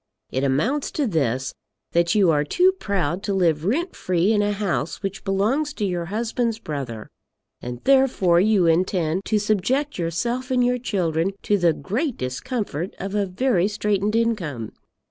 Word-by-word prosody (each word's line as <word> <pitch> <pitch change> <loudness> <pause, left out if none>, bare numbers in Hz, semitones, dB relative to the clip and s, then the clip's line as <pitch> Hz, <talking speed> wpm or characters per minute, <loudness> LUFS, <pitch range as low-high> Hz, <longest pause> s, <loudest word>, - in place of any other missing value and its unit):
It 130 - -1
amounts 215 - +1
to 295 - 0
this, 135 - 0 0.4
that 170 +1 +2
you 195 -5 +5
are 150 -1 +2
too 360 - +3
proud 195 - -2
to 200 -1 -2
live 165 -4 +2
rent 330 - 0
free 180 +3 +1
in 210 - +3
a 205 0 +1
house 200 -4 -2
which 195 0 -4
belongs 225 +10 0
to 210 - -2
your 175 -3 -2
husband's 230 +3 -1
brother, 135 - -5 0.5
and 120 0 -7
therefore 260 -11 +4
you 200 -1 +3
intend 170 +1 +1
to 215 - +1
subject 215 +7 0
yourself 235 - -2
and 250 -1 +2
your 250 0 +1
children 180 -5 0
to 205 - +2
the 175 -4 +3
great 235 - -2
discomfort 180 - -3
of 195 +1 -5
a 205 -1 +1
very 190 -1 +1
straitened 210 0 0
income. 175 - -1
195 Hz, 165 wpm, -23 LUFS, 170-230 Hz, 0.5 s, you